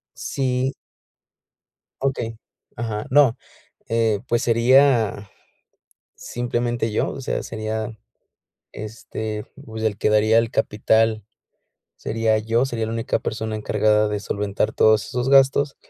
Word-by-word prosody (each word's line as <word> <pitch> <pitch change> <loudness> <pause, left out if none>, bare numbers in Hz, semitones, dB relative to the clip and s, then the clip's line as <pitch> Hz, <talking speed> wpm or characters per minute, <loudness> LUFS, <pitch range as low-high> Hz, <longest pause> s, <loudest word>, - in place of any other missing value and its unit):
Sí. 130 0 -1 1.3
Okey, 125 -4 -2 0.4
ajá, 110 -2 -4
no, 130 -3 +4 0.5
eh, 115 -2 +1
pues 120 0 +1
sería 115 -3 +3 0.9
simplemente 120 -1 -2
yo, - - 0
o - - -7
sea, 130 - -2
sería, 110 0 -4 0.8
este, 110 0 -6 0.2
pues, 110 -2 -7
el 105 -2 0
que 105 - +1
daría 110 +1 +4
el 115 0 +1
capital, 110 0 +1 0.7
sería 110 0 0
yo, 115 +4 +1
sería 115 -4 -3
la 110 - -4
única 115 0 -1
persona 110 0 -4
encargada 105 0 +2
de 105 -1 -2
solventar 100 +1 -2
todos 110 -1 +4
esos 125 +1 -2
gastos. 135 +1 +4
110 Hz, 115 wpm, -22 LUFS, 110-120 Hz, 1.3 s, no